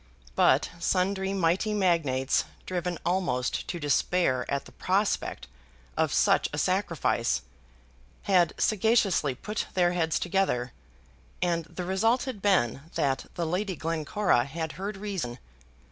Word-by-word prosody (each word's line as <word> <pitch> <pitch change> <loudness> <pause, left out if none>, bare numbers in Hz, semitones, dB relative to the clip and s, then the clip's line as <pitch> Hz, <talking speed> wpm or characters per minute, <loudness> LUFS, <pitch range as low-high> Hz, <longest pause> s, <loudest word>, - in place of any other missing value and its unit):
But - - +4
sundry 190 +2 0
mighty 190 +3 +1
magnates, 155 -9 +2 0.2
driven 180 -1 -2
almost 175 -9 0
to 175 - -4
despair 145 -3 +1
at 140 - -1
the - - -13
prospect 195 +3 -1 0.5
of - - +1
such - - +3
a - - -4
sacrifice, - - 0 0.8
had 180 -4 +3
sagaciously 210 - +2
put 210 - -4
their 175 -2 +3
heads 165 -2 +1
together, 175 -10 0 0.7
and 170 -2 0
the 180 +2 -6
result 225 +7 +2
had 255 -7 -5
been 175 - +2
that 135 -1 0
the 170 - -1
Lady 185 +3 -1
Glencora 160 -2 +1
had 160 +2 -4
heard 195 +2 -5
reason. 190 -12 -4
180 Hz, 125 wpm, -28 LUFS, 155-195 Hz, 0.8 s, But